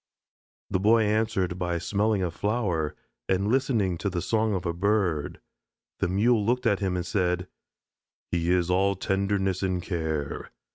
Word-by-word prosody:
The 95 - +1
Boy 110 +3 +4
answered 105 -4 0
by 90 -1 -1
smelling 100 +4 0
a 90 - -1
flower 95 - -1 0.3
and 95 +1 +1
listening 115 -9 +1
to 100 - -1
the 90 -2 -2
song 110 +3 +1
of 90 - -3
a 85 - 0
bird. 90 -5 0 0.6
The - - +1
Mule 105 +4 +3
looked 125 +4 0
at 100 -4 +3
him 95 -3 -1
and 90 -1 -2
said: 90 -1 0 0.8
"He 85 -1 0
is 90 -1 +2
all 100 +2 +2
tenderness 95 0 0
and 95 -2 0
care. 80 -5 -3
95 Hz, 155 wpm, -27 LUFS, 90-105 Hz, 0.8 s, Boy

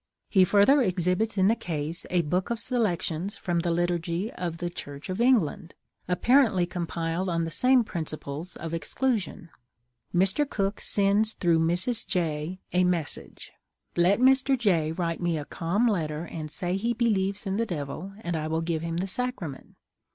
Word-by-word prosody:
He 190 -3 +6
further 210 +10 +5
exhibits 185 +1 0
in 190 0 +4
the 225 - +4
case 165 -5 -4
a 180 -1 +2
book 180 +5 -1
of 235 - -1
selections 200 -6 -1
from 175 -3 -1
the 170 +1 -1
liturgy 175 +4 -1
of 170 -2 -4
the 175 +1 -3
Church 145 -2 -8
of 185 +5 -2
England, 205 - +2 0.3
apparently 195 +1 +3
compiled 170 0 -3
on 165 -1 0
the 165 - -5
same 255 +7 +4
principle 155 -5 -5
of 165 -1 -6
exclusion.. 200 -1 -2 0.6
Mr. 195 +11 +2
Cook 200 -3 -2
sends 205 +2 +3
through 170 -2 +2
Mrs. 175 +8 +1
J. 165 -1 -2
a 180 0 +4
message: 175 -4 -3 0.4
"Let 180 +5 +3
Mr. 265 +1 +4
J. 175 -9 +1
write 165 0 -2
me 170 -2 0
a 145 - -5
calm 190 +11 0
letter, 160 -6 -1
and 155 -3 -6
say 180 +4 -2
he 230 +4 0
believes 205 -4 0
in 195 0 -1
the 230 - +1
Devil, 160 +3 -5
and 175 -5 -3
I 155 -1 -2
will 160 +1 -1
give 165 -1 -2
him 165 0 -3
the 185 +2 -1
Sacrament." 195 - -2
180 Hz, 165 wpm, -27 LUFS, 165-210 Hz, 0.6 s, He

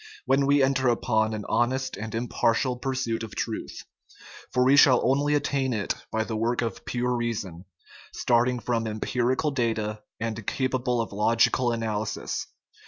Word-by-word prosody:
when 135 0 +2
we 140 0 +4
enter 135 -1 +2
upon 110 -2 +1
an 105 -1 -4
honest 130 +2 0
and 110 +1 -6
impar 115 0 +1
tial 125 -1 -1
pursuit 130 -4 -2
of 110 -2 -7
truth; - - -4 0.7
for 125 - +2
we 135 +2 +6
shall 135 -3 +7
only 145 +3 +2
attain 140 -3 0
it 105 -3 -1 0.2
by 110 0 0
the 110 0 -4
work 120 +3 0
of 115 - -4
pure 125 0 -1
reason, 105 -7 -3 0.5
starting 125 +1 +2
from 115 -1 -1
empirical 125 +7 0
data 110 -4 -1 0.2
and 115 -2 -4
capable 130 -2 0
of 115 - -5
logical 115 +4 +2
analysis. 110 -2 -3
120 Hz, 155 wpm, -26 LUFS, 110-130 Hz, 0.7 s, shall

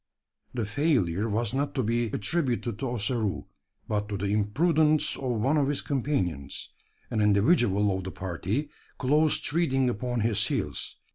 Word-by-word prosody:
The 115 -3 -1
failure 110 - +1
was 115 +2 -1
not 140 +1 -1
to 130 - +1
be 115 +2 +1
attributed 120 - -1
to 135 - -2
Ossaroo; 115 -3 -1 0.4
but 105 0 -1
to 100 - -2
the 100 +1 -1
imprudence 155 - +2
of 125 -4 -2
one 135 +8 +2
of 140 -2 +2
his 145 0 0
companions 95 - -2 0.4
an 110 - +1
individual 105 - +3
of 95 - -4
the - - -3
party 95 - -3 0.3
close 150 +3 +3
treading 135 -6 +1
upon 120 +2 -2
his 105 -2 +1
heels. - - -2
120 Hz, 150 wpm, -27 LUFS, 105-140 Hz, 0.4 s, individual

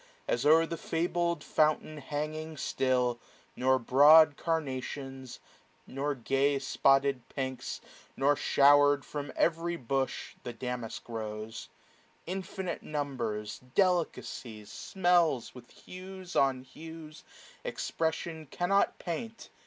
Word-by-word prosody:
As 120 - +1
o'er 165 +2 +6
the 165 0 -5
fabled 170 +1 -1
fountain 155 0 +1
'hanging 155 +2 -4
still; 125 -3 0 0.4
Nor 130 +1 +3
broad 145 +5 +7
carnations, 135 -4 -4 0.5
nor 140 +2 -2
gay 135 +3 +1
spotted 135 0 +2
pinks; 130 -2 -4 0.4
Nor, 140 +2 +3
shower'd 145 0 +5
from 145 -2 -5
every 170 +1 +1
bush, 135 -1 -2
the 120 - -6
damask 125 -1 -5
rose. 110 -1 -6 0.6
Infinite 190 0 -4
numbers, 120 -8 -3 0.2
delicacies, 155 - 0
smells, 175 - +2
550 - - -19 0.2
With - - -20
hues 185 0 -9
on 135 -2 +3
hues 160 +2 -11 0.4
expression 160 -1 -3
cannot 185 +7 +1
paint. 220 +7 -6
145 Hz, 105 wpm, -30 LUFS, 130-165 Hz, 0.6 s, broad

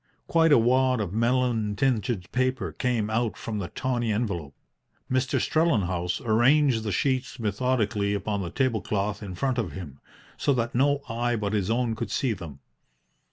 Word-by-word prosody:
Quite 165 -1 +3
a 145 - +8
wad 130 +2 +3
of 100 -4 -3
melon 115 -2 +1
tinted 110 -5 0
paper 130 +1 0
came 115 -4 -1
out 115 0 0
from 110 -2 -4
the 95 - -3
tawny 120 +1 -1
envelope. 95 - -2 0.6
Mr. 130 0 +1
Strellenhaus 95 - +1
arranged 120 +2 +3
the 110 -1 -3
sheets 130 +2 -1
methodically 105 -2 0
upon 100 0 -2
the 85 - -4
table 125 +1 0
cloth 100 0 -2
in 95 -3 -6
front 130 +5 0
of 95 -10 -3
him, 75 -7 -8 0.4
so 140 - +2
that 120 -2 -1
no 140 +3 +2
eye 120 +1 -1
but 105 -2 -2
his 100 -2 0
own 115 0 +1
could 110 -1 -4
see 130 -4 0
them. 80 -8 -9
115 Hz, 165 wpm, -26 LUFS, 100-130 Hz, 0.6 s, a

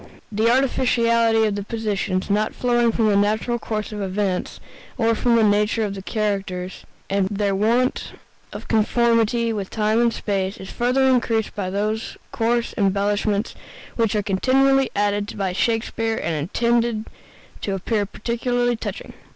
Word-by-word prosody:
The 220 +2 +2
artificiality 235 -3 +3
of 210 - 0
the 205 - -3
positions, 205 -4 -2
not 215 +1 0
flowing 240 -1 +2
from 220 -1 +1
the 205 - +3
natural 215 +4 +1
course 215 -2 -4
of 210 -1 -5
events, 190 -1 -2 0.4
or 230 -2 +2
from 235 +1 +2
the 230 - +4
nature 210 +2 +2
of 205 -2 -2
the 195 - -7
characters, 195 -3 -3 0.2
and 195 -1 +1
their 200 -1 0
want 235 +6 +1 0.4
of - - -8
conformity 230 +1 +2
with 200 -3 -4
time 215 +1 +1
and 235 -1 +3
space, 195 -3 -2
is 190 - -9
further 250 +3 +1
increased 235 -4 +1
by 195 -3 -3
those 215 +3 -2
coarse 235 +1 0
embellishments 205 +2 0 0.4
which 225 -3 +1
are 210 - +1
continually 270 +7 +2
added 205 0 -1
by 190 -2 -1
Shakespeare 225 +1 -1
and 170 - -2
intended 230 +8 0 0.6
to 195 - -2
appear 205 +2 -1
particularly 245 +3 -1
touching. 225 - -6
215 Hz, 150 wpm, -22 LUFS, 200-235 Hz, 0.6 s, the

